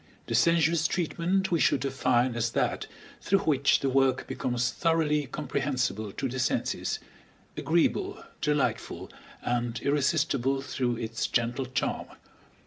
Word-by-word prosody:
The - - -4
sensuous 165 -1 +3
treatment 180 +3 0
we 170 - +2
should - - +3
define 130 -2 +1
as 115 0 -1
that - - 0 0.3
through 195 0 +2
which 140 -3 +3
the 135 - +1
work 130 -1 +2
becomes 125 0 -1
thoroughly 155 -4 +1
comprehensible 130 -6 -2
to 135 - -2
the 130 +1 -4
senses, 130 - 0 0.6
agreeable, - - 0 0.2
delightful, 150 -2 -1 0.3
and 120 -1 -1
irresistible 140 -2 +1
through 125 -3 -1
its 115 0 -2
gentle 120 +2 0
charm. 130 - -2
135 Hz, 125 wpm, -28 LUFS, 125-155 Hz, 0.6 s, sensuous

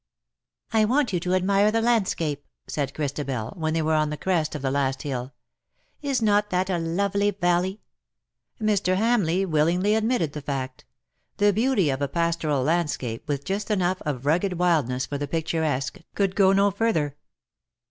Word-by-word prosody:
" - - -65 0.3
I 220 -1 +4
want 250 0 +1
you 175 - +1
to 180 +2 0
admire 195 +3 +3
the 225 +1 +1
landscape,'' 190 -11 0 0.2
said 140 -2 -3
Christabel, 140 -6 -3
when 160 -2 -1
they 165 - +1
were 160 +1 +1
on 155 -1 +2
the 150 - -4
crest 165 -4 0
of 145 - -5
the 135 - 0
last 135 0 -1
hill; 130 -3 -4 0.4
" - - -44
is 250 -4 +1
not 210 -1 +3
that 185 0 0
a 175 - 0
lovely 200 +5 0
valley 185 0 0 0.4
?" - - -59
Mr. 205 -4 +1
Hamleigh 195 -5 +2
willingly 170 +6 +2
admitted 220 - +1
the 150 - -5
fact. 130 -2 -5 0.5
The 205 0 +4
beauty 215 - +2
of 135 +1 -3
a 140 - +1
pastoral 165 -4 0
landscape, 150 -6 -1
with 140 -1 -2
just 200 +3 -3
enough 185 -3 0
of 140 -3 -4
rugged 175 +6 +2
wildness 155 -8 +1
for 145 - -4
the 145 - -3
picturesque, 160 0 -1 0.2
could 195 -2 0
go 195 -2 +5
no 200 +1 +3
further. 160 -10 0
170 Hz, 180 wpm, -25 LUFS, 145-200 Hz, 0.5 s, go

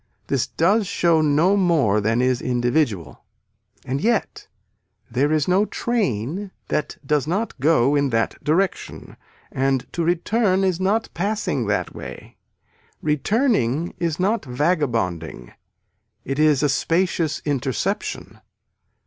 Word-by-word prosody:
This - - 0
does 200 +5 +2
show 170 -4 +2
no 155 +6 +3
more 155 - +2
than 115 +4 +1
is 125 -1 +1
individual. 120 - -1 0.6
And 135 +2 -2
yet 230 +1 -1 0.6
there 135 +5 +1
is 155 -2 +1
no 190 +3 +3
train 195 - -2 0.2
that 150 - -2
does 150 -1 +1
not 195 +1 -2
go 140 -1 +3
in 140 -1 +2
that 115 -2 -1
direction 180 +6 -1 0.4
and 135 -1 0
to 170 - -1
return 190 +3 +1
is 185 -2 +1
not 205 +4 0
passing 195 - -1
that 105 - -1
way. - - -10 0.7
Returning 160 - +1
is 165 -2 -1
not 210 +5 +1
vagabonding 120 - -1 0.7
it 135 +1 -3
is 150 -3 +4
a 145 - +3
spacious 165 +2 0
interception. 145 - -3
155 Hz, 120 wpm, -22 LUFS, 130-185 Hz, 0.7 s, is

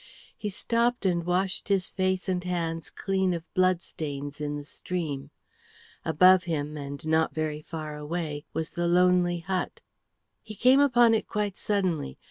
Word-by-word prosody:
He 210 - -4
stopped 235 +3 +1
and 175 -2 +1
washed 185 +2 0
his 195 -3 +2
face 185 0 -1
and 180 -1 -1
hands 165 -3 -2
clean 190 -2 0
of 165 - -5
blood 185 -1 +2
stains 145 -2 -5
in 145 0 -2
the 145 - -6
stream. 145 -5 -4 0.7
Above 180 +4 +5
him 150 -3 -2
and 140 0 -6
not 160 0 +2
very 155 -1 -2
far 155 -1 -6
away 150 -1 -4
was 160 0 -3
the 175 0 -1
lonely 175 0 +3
hut. 185 +1 -3 0.6
He 215 - -10
came 255 +5 +5
upon 240 -5 +5
it 220 - 0
quite 210 -2 -2
suddenly. 180 - -1
175 Hz, 155 wpm, -27 LUFS, 155-190 Hz, 0.7 s, Above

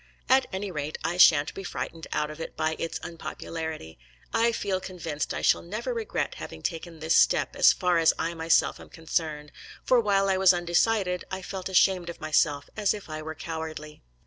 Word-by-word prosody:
At 260 0 +4
any 190 +1 -4
rate 150 -1 -4
I 175 - -1
sha'n't 150 -4 +6
be 195 - -7
frightened 165 -2 -5
out 150 0 -1
of 155 - -11
it - - -7
by 155 0 0
its 165 - -3
unpopularity. 160 - -6 0.3
I 230 +1 +3
feel 195 -4 -1
convinced 170 -5 -4
I - - -4
shall - - +4
never 215 +8 -4
regret 230 -2 -3
having 80 - -8
taken 165 0 -4
this 160 +1 +2
step, - - +3
as - - +7
far 180 -3 +1
as 165 - +5
I 170 - -2
myself 165 0 +2
am - - -13
concerned; 155 -2 -3 0.3
for 255 - +4
while 200 -3 +2
I 190 -1 +2
was 190 -1 +6
undecided, 180 +2 +1
I 190 0 -5
felt 190 0 -5
ashamed 185 -1 +3
of 170 - -8
myself 145 -2 +1
as 210 -1 +1
if 200 -6 -10
I 155 0 -5
were 160 +1 -6
cowardly. 160 -2 -6
170 Hz, 195 wpm, -27 LUFS, 160-190 Hz, 0.3 s, as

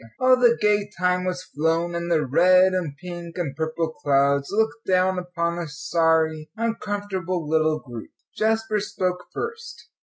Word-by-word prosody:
All 255 0 +6
the 240 -2 +4
gay 205 -1 +2
time 180 +1 +1
was 180 0 -3
flown, 165 +1 -1
and 170 0 -3
the 155 -3 +2
red 185 +7 +5
and 165 -6 -2
pink 175 0 -8
and 155 -6 -3
purple 160 +1 -2
clouds 140 -1 +1
looked 220 +2 -1
down 185 0 +2
upon 170 -1 -3
a 170 - -4
sorry, 160 +1 0
uncomfortable 205 -6 -3
little 155 0 +2
group. 120 -7 -9 0.3
Jasper 220 0 +1
spoke 185 -3 -3
first. 460 0 -7
180 Hz, 150 wpm, -24 LUFS, 160-205 Hz, 0.3 s, All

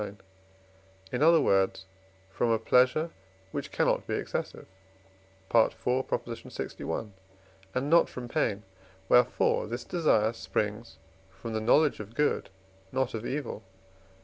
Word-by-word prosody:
lix.), 105 -1 -5 1.0
in - - -2
other 165 +1 +6
words, 95 -6 +2 0.5
from 115 +4 0
a 115 - +3
pleasure 125 +8 +3 0.4
which - - -5
cannot - - +1
be - - -1
excessive - - -4 0.9
(IV. 115 -1 +5
lxi.), 120 -3 -3 0.7
and 130 +2 0
not 170 +3 +5
from 125 -1 -7
pain; 105 -3 -1 0.4
wherefore 125 -1 +3
this 120 +2 -4
desire 115 -9 +2
springs 110 0 -3 0.3
from 110 +4 -8
the 110 - -1
knowledge 145 +6 +3
of 105 +2 -9
good, 150 0 +1 0.4
not 130 -1 -1
of 115 +1 -4
evil 145 +1 -3
(IV. 105 - -18
120 Hz, 125 wpm, -29 LUFS, 110-130 Hz, 1.0 s, other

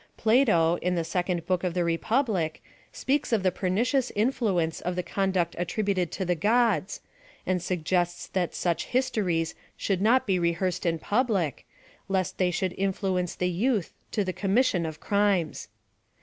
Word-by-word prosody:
Plato, 215 -8 +4
in 180 0 0
the 170 - 0
second 175 0 -2
book 185 -1 0
of 180 -2 -1
the 175 - +2
Republic, 175 - 0 0.3
speaks 275 0 -1
of 220 -4 +2
the 185 - +3
pernicious 230 +9 0
influence 205 -8 0
of 180 +1 -2
the 180 - -1
conduct 190 -3 0
attributed 185 -1 -1
to 190 - -2
the 180 - +2
gods, 215 +3 +1 0.4
and 185 -1 0
suggests 175 0 -1
that 180 -3 -2
such 170 -2 0
his 260 +1 +1
tories 165 -6 0 0.2
should 190 -2 -1
not 240 +5 +4
be 190 -3 +1
rehearsed 170 +1 0
in 165 -1 +1
public, 200 - 0 0.4
lest 190 -2 -1
they 185 -1 +3
should 180 +1 -1
influence 190 -2 -1
the 180 0 0
youth 210 +1 0 0.2
to 210 - 0
the 185 -1 -3
commission 195 -4 +1
ot 155 -1 -7
crimes. 200 -5 0
185 Hz, 160 wpm, -27 LUFS, 175-210 Hz, 0.4 s, Plato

